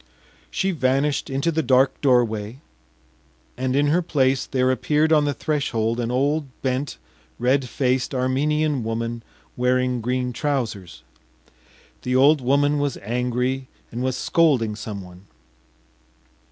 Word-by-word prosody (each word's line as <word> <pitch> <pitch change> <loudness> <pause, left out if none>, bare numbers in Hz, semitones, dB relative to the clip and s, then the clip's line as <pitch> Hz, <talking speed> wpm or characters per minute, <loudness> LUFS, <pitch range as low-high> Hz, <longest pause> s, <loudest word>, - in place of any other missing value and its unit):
She 190 - 0
vanished 140 -1 0
into 135 +5 0
the 160 0 0
dark 130 -1 +2
doorway, 120 -4 +1 1.0
and 130 +1 -1
in 145 +1 +3
her 170 +4 +3
place 135 -5 +1
there 130 -1 +1
appeared 150 +5 +2
on 150 -1 +4
the 145 - 0
threshold 120 -6 -1
an 120 -1 -1
old 140 +4 0 0.2
bent, 130 - -2 0.4
red 130 +1 +1
faced 130 +1 0
Armenian 140 +2 0
woman 115 +1 -3 0.3
wearing 125 0 +1
green 125 +1 -1
trousers. 120 - -3 1.0
The 125 0 -1
old 140 +3 +5
woman 145 +3 +2
was 145 -2 -1
angry 125 +3 -1 0.2
and 120 - -4
was 130 0 -1
scolding 130 -12 +2
someone. 100 -3 -8
130 Hz, 125 wpm, -23 LUFS, 120-145 Hz, 1.0 s, old